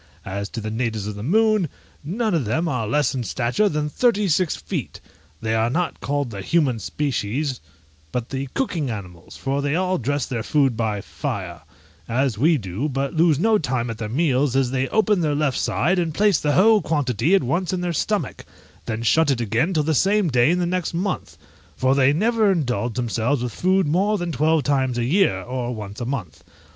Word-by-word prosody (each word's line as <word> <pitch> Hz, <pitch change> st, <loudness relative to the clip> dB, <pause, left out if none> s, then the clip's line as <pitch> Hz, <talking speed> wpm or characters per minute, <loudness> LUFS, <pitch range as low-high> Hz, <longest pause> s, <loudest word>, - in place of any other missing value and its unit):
As 100 Hz, +1 st, -4 dB
to 115 Hz, -, -5 dB
the 110 Hz, 0 st, -4 dB
natives 110 Hz, -3 st, -2 dB
of 105 Hz, -, -4 dB
the 105 Hz, -, -8 dB
moon, 215 Hz, -, +2 dB, 0.3 s
none 210 Hz, +7 st, -1 dB
of 155 Hz, -7 st, +1 dB
them 160 Hz, +11 st, 0 dB
are 125 Hz, -8 st, -1 dB
less 145 Hz, +6 st, +1 dB
in 130 Hz, -2 st, -2 dB
stature 120 Hz, -, 0 dB
than 150 Hz, -2 st, -1 dB
thirty 210 Hz, +4 st, +2 dB
six 175 Hz, 0 st, +1 dB
feet: -, -, -5 dB, 0.4 s
they 110 Hz, 0 st, -1 dB
are 115 Hz, +1 st, +2 dB
not 170 Hz, +7 st, -1 dB
called 140 Hz, -2 st, -1 dB
the 100 Hz, -2 st, -6 dB
human 135 Hz, -, +1 dB
species, 135 Hz, -, -2 dB, 0.5 s
but 120 Hz, -1 st, -3 dB
the 135 Hz, 0 st, -4 dB
cooking 165 Hz, -, -1 dB
animals, 90 Hz, -6 st, -8 dB
for 135 Hz, +1 st, -1 dB
they 145 Hz, +1 st, 0 dB
all 185 Hz, +1 st, 0 dB
dress 140 Hz, +2 st, -1 dB
their 120 Hz, -3 st, -3 dB
food 135 Hz, 0 st, +2 dB
by 110 Hz, -3 st, -1 dB
fire, -, -, -5 dB, 0.5 s
as 130 Hz, 0 st, +1 dB
we 155 Hz, +9 st, +3 dB
do, 105 Hz, +6 st, -3 dB
but 135 Hz, 0 st, -2 dB
lose 160 Hz, -2 st, +3 dB
not 215 Hz, +5 st, +3 dB
time 125 Hz, -4 st, -1 dB
at 115 Hz, -, -8 dB
their 110 Hz, -2 st, -4 dB
meals, 135 Hz, -1 st, +1 dB
as 135 Hz, -2 st, +2 dB
they 130 Hz, 0 st, 0 dB
open 215 Hz, -1 st, +2 dB
their 150 Hz, -3 st, +1 dB
left 145 Hz, -3 st, 0 dB
side, 180 Hz, +6 st, +1 dB
and 165 Hz, -3 st, -2 dB
place 205 Hz, -5 st, +3 dB
the 145 Hz, -1 st, 0 dB
whole 215 Hz, +4 st, +5 dB
quantity 145 Hz, -, +1 dB
at 195 Hz, -, +2 dB
once 170 Hz, +9 st, -1 dB
in 185 Hz, -1 st, -2 dB
their 175 Hz, -1 st, -1 dB
stomach, 210 Hz, +5 st, -2 dB, 0.4 s
then 115 Hz, +1 st, -3 dB
shut 160 Hz, +6 st, +3 dB
it 135 Hz, -3 st, +1 dB
again 120 Hz, -, 0 dB
till 155 Hz, -4 st, +1 dB
the 160 Hz, +2 st, +1 dB
same 195 Hz, +3 st, +2 dB
day 125 Hz, 0 st, +3 dB
in 175 Hz, -, +2 dB
the 180 Hz, -, 0 dB
next 180 Hz, -1 st, -2 dB
month; 185 Hz, +3 st, -3 dB, 0.4 s
for 130 Hz, +1 st, +2 dB
they 135 Hz, 0 st, +4 dB
never 215 Hz, +5 st, +2 dB
indulge 125 Hz, -, -1 dB
themselves 120 Hz, +2 st, 0 dB
with 120 Hz, -3 st, -3 dB
food 190 Hz, +1 st, +2 dB
more 195 Hz, +8 st, +1 dB
than 175 Hz, -2 st, -3 dB
twelve 155 Hz, +1 st, +2 dB
times 130 Hz, -3 st, +1 dB
a 120 Hz, -, 0 dB
year, 150 Hz, -, +2 dB
or 125 Hz, 0 st, -3 dB
once 105 Hz, +1 st, -7 dB
a -, -, -2 dB
month. 120 Hz, -, -5 dB
140 Hz, 205 wpm, -22 LUFS, 120-175 Hz, 0.5 s, whole